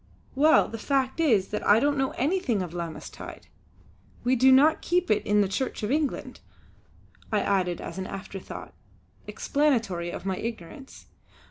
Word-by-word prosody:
"Well, 300 Hz, +4 st, +5 dB
the 225 Hz, -, -7 dB
fact 270 Hz, +3 st, 0 dB
is 225 Hz, -12 st, +3 dB
that 210 Hz, -, -3 dB
I 210 Hz, +2 st, +5 dB
don't 285 Hz, +3 st, +2 dB
know 270 Hz, -1 st, 0 dB
anything 270 Hz, -, 0 dB
of 175 Hz, -2 st, -7 dB
'Lammas 170 Hz, -2 st, -5 dB
tide!' -, -, -10 dB, 0.8 s
We 250 Hz, +2 st, +2 dB
do 260 Hz, +2 st, +5 dB
not 295 Hz, +5 st, +5 dB
keep 355 Hz, -3 st, 0 dB
it 210 Hz, -, +2 dB
in 210 Hz, 0 st, +4 dB
the 200 Hz, -, +2 dB
Church 230 Hz, +4 st, -3 dB
of 210 Hz, -, -1 dB
England," 295 Hz, -1 st, -2 dB, 0.9 s
I 210 Hz, -2 st, +2 dB
added 185 Hz, -4 st, 0 dB
as -, -, -7 dB
an 190 Hz, -, -4 dB
afterthought, 195 Hz, -1 st, -8 dB, 0.5 s
explanatory 225 Hz, -, 0 dB
of 175 Hz, -, -7 dB
my 190 Hz, -1 st, -1 dB
ignorance. 230 Hz, -, -8 dB
230 Hz, 160 wpm, -26 LUFS, 195-280 Hz, 0.9 s, Well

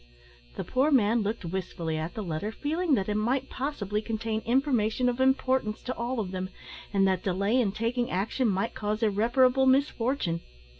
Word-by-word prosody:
The -, -, -3 dB
poor 265 Hz, +4 st, +1 dB
man 235 Hz, -4 st, +3 dB
looked 210 Hz, -1 st, -3 dB
wistfully 170 Hz, -2 st, -3 dB
at 160 Hz, +2 st, -4 dB
the 215 Hz, -, -3 dB
letter, 175 Hz, +4 st, -3 dB
feeling 310 Hz, +5 st, 0 dB
that 195 Hz, -4 st, -1 dB
it 210 Hz, -, 0 dB
might 250 Hz, +6 st, 0 dB
possibly 215 Hz, -7 st, -2 dB
contain 220 Hz, 0 st, -2 dB
information 250 Hz, -2 st, +2 dB
of 245 Hz, 0 st, 0 dB
importance 260 Hz, -4 st, +1 dB
to 255 Hz, -, -3 dB
all 240 Hz, +1 st, -2 dB
of 195 Hz, -4 st, -3 dB
them, 185 Hz, 0 st, -4 dB, 0.4 s
and 195 Hz, -1 st, +3 dB
that 185 Hz, -2 st, +1 dB
delay 200 Hz, +6 st, +1 dB
in 210 Hz, -5 st, +1 dB
taking 230 Hz, +3 st, -1 dB
action 210 Hz, +7 st, 0 dB
might 195 Hz, +2 st, 0 dB
cause 215 Hz, +2 st, -2 dB
irreparable 250 Hz, +5 st, +3 dB
misfortune. 260 Hz, -, +1 dB
225 Hz, 170 wpm, -28 LUFS, 200-255 Hz, 0.4 s, man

